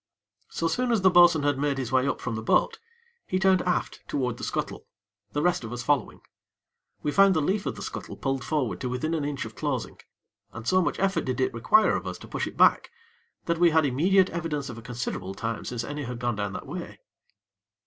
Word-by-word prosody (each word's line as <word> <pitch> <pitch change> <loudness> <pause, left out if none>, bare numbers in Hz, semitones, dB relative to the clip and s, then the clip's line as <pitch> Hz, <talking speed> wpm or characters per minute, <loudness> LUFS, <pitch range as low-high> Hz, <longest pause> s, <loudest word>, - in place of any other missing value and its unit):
So 165 - -1
soon 245 +9 0
as 220 -5 +1
the 190 - +6
bo'sun 175 -4 +6
had 145 -2 +1
made 145 -1 0
his 130 -3 -3
way 130 +1 +3
up 140 - -1
from 115 - -4
the 110 - -3
boat, 110 - +2 0.5
he 185 - 0
turned 190 -1 +4
aft 180 -1 -1
toward 125 -4 -2
the - - -9
scuttle, - - -4 0.5
the 145 - 0
rest 175 -7 +1
of 115 - -6
us 120 0 -4
following. 145 0 0 0.8
We 150 - 0
found 195 +4 +5
the - - +3
leaf 190 +7 0
of - - -2
the - - -7
scuttle - - -7
pulled 135 -1 -2
forward 145 -7 -1
to 125 - -2
within 140 +6 -2
an 160 -3 -1
inch 145 -3 -3
of 110 - -9
closing, 135 -2 -3 0.5
and 110 +2 -8
so 185 0 +4
much - - -1
effort 195 0 0
did 130 -1 -2
it 130 - +1
require 115 - +4
of - - -4
us - - -4
to - - -12
push - - -3
it - - -9
back, - - +4 0.6
that 170 -1 0
we 175 -1 +6
had 160 -1 +3
immediate 180 +8 +3
evidence 155 -5 -3
of 120 - -7
a - - -11
considerable 115 -6 -5
time 115 +2 -4
since 120 -2 -3
any 145 +3 -5
had 125 0 -5
gone 120 -2 -2
down 100 -2 -2
that - - -6
way. - - -7
145 Hz, 230 wpm, -26 LUFS, 125-175 Hz, 0.8 s, the